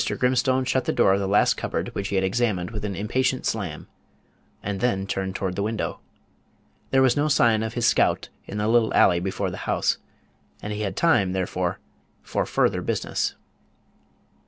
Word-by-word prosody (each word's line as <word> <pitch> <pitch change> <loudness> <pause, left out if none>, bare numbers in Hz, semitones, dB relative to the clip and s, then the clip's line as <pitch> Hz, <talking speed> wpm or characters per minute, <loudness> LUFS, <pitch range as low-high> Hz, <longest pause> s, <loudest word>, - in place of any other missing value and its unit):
Grimstone 130 +1 +2
shut 130 0 0
the - - +1
door 120 -5 +4
of 100 - +1
the 100 - -1
last 100 +2 +3
cupboard - - -3
which 100 - -3
he 100 - -3
had 95 - +2
examined 95 -2 0
with 105 -2 -5
an 100 -2 -3
impatient 130 +6 0
slam, 90 -9 -3 0.8
and 100 -1 -3
then 95 -6 0
turned 95 -1 -3
toward 95 -2 -2
the 100 - -2
window. 110 +1 -2 0.9
There 135 0 +4
was 130 - +4
no 145 +1 +1
sign 115 -7 +3
of 110 +1 -4
his 120 -1 0
scout - - +2 0.2
in 105 - -6
the 105 0 0
little 115 0 +3
alley 85 -2 +5
before 95 +1 -2
the - - -6
house, - - +1 0.6
and 105 - -5
he 105 - -4
had 100 -3 -2
time, 100 - +3
therefore, 90 -1 -1 0.5
for - - -2
further - - +1
business. - - -2
105 Hz, 180 wpm, -24 LUFS, 95-120 Hz, 0.9 s, alley